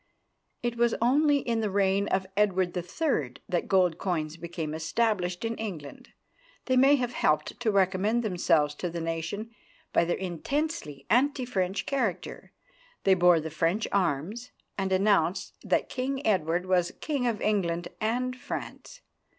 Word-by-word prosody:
It 240 -1 -1
was 235 0 +3
only 285 +5 +4
in 230 -2 -1
the 215 -2 0
reign 195 0 +2
of 190 0 0
Edward 190 -3 +1
III. 175 - -1
that 175 -2 -1
gold 180 -4 +3
coins 160 -5 -2
became 165 -2 -5
established 180 +3 -1
in 225 - -1
England 170 -10 -7 0.6
They 255 - +1
may 270 +3 +6
have 245 -3 -2
helped 150 -6 0
to 240 -2 0
recommend 200 +4 +2
themselves 170 -7 +2
to 180 - -3
the 170 0 -5
nation 165 +7 -4 0.4
by 170 - +4
their 175 - 0
intensely 190 - -3
anti 260 +2 +3
French 190 -5 -1
character. 230 -10 -2 0.5
They 195 - +5
bore 175 -2 +5
the 160 0 -5
French 165 +7 0
arms, 190 - -1 0.3
and 195 -1 -2
announced 190 -2 +2
that - - +1
King 270 +2 -3
Edward 180 -3 +1
was 180 -2 +1
King 280 -5 -1
of 225 -3 -1
England 175 -5 0
and 245 +3 -1
France. - - -7
190 Hz, 150 wpm, -28 LUFS, 170-235 Hz, 0.6 s, may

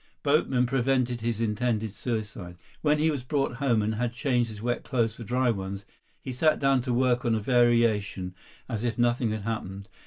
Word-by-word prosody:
Boatmen 140 -4 +2
prevented 125 -1 +1
his 115 -1 -1
intended 110 -1 -1
suicide. 105 -7 -5 0.2
When 150 -1 +3
he 155 +1 +2
was 140 -4 -3
brought 135 -2 -1
home 120 -6 +2
and 110 +1 0
had 120 +2 -2
changed 120 -2 0
his 105 -1 -9
wet 120 +2 -2
clothes 115 -4 0
for 115 - -9
dry 125 +2 +1
ones, 100 -1 -5 0.3
he 130 - -6
sat 155 +5 +3
down 135 -2 +3
to 125 +1 -3
work 125 0 +2
on 115 -3 +2
a - - 0
variation 115 -5 +2 0.3
as 115 -1 -3
if 120 -1 -1
nothing 120 -1 +2
had 110 -1 -3
happened. 100 -3 -4
120 Hz, 190 wpm, -27 LUFS, 110-125 Hz, 0.3 s, When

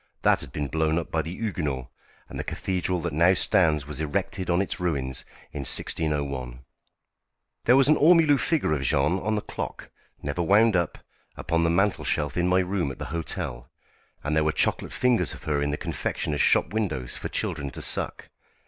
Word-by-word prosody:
That - - +4
had - - -9
been 75 -1 -3
blown 80 +3 +1
up 85 - -3
by 80 - +1
the 80 - -6
Huguenots, 80 - -3 0.4
and - - -8
the - - -2
cathedral 90 -1 -2
that - - -3
now 85 +5 +4
stands 75 -5 +2
was 75 0 -6
erected 80 +4 -2
on 85 0 +3
its 100 0 -2
ruins 70 -8 -2 0.3
in 75 - -5
1601. 70 -3 -2 1.0
There 120 - +6
was 135 0 +5
an 155 - +5
ormolu 155 -3 +5
figure 155 - +1
of 75 - -1
Jeanne 70 +7 +2
on 110 +3 -1
the 105 - -2
clock - - -6 0.3
never 70 +4 -2
wound 105 +5 +4
up 85 -3 0 0.4
upon 85 +1 0
the 85 - +3
mantelshelf 85 -5 +1
in 90 0 +1
my 90 +1 +4
room 90 -6 -1
at - - -9
the - - -5
hotel, 70 -7 -4 0.5
and 75 +2 -1
there 80 - +3
were 80 - +2
chocolate - - 0
figures 120 -9 +1
of - - -14
her 75 -2 0
in 70 - 0
the 75 - -1
confectioners' 75 -2 -2
shop - - +3
windows 80 - -2
for - - -5
children 70 -1 -2
to - - -8
suck. - - -2
80 Hz, 190 wpm, -26 LUFS, 70-95 Hz, 1.0 s, There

